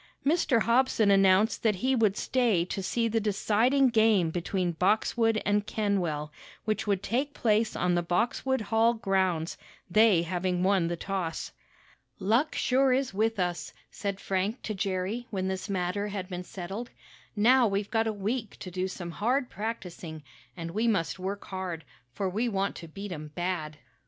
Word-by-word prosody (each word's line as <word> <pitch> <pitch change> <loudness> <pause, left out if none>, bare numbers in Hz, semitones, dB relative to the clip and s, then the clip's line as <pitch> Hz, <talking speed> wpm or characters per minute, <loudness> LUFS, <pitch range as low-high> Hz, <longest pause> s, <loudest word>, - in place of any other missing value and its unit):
Mr. 275 -7 +3
Hobson 235 -3 +3
announced 195 +2 +4
that 215 -3 +2
he 260 +8 +1
would 215 -4 +2
stay 230 -9 +1
to 195 +2 -4
see 230 +5 0
the 225 0 +1
deciding 225 +6 +2
game 220 -7 +3
between 180 +1 -1
Boxwood 220 +5 +2
and 205 0 +1
Kenwell, 175 -8 -1 0.3
which 215 0 -1
would 200 -1 0
take 275 +5 -1
place 220 -1 +1
on 180 0 +1
the 175 - +2
Boxwood 230 +9 0
Hall 225 +2 +2
grounds, 190 -6 0 0.3
they 215 -3 +5
having 180 +1 -1
won 190 -3 +3
the 170 - -2
toss. 185 -3 -3 0.7
"Luck 225 +10 +1
sure 265 +1 +3
is 260 -3 +1
with 220 +1 0
us," 175 -1 -2 0.2
said 200 -1 -4
Frank 195 +6 -2
to 215 - -3
Jerry 195 +4 -2
when 190 -2 -2
this 190 +2 -3
matter 190 +1 -1
had 195 -3 -4
been 180 -1 -5
settled. 195 +6 -6 0.5
"Now 240 +4 +5
we've 200 0 -2
got 225 0 +2
a - - +1
week 215 +2 -3
to 185 - -6
do 185 +1 -1
some 175 -2 -6
hard 245 +8 0
practicing, 180 -7 -6 0.3
and 165 0 -5
we 220 +6 0
must 195 -5 0
work 195 +2 -4
hard, 185 -4 -5 0.3
for 195 +10 -2
we 220 +6 0
want 195 -2 -1
to 170 - -9
beat 195 +5 -7
'em 155 -3 -6
bad." 175 -4 -3
200 Hz, 165 wpm, -28 LUFS, 180-225 Hz, 0.7 s, they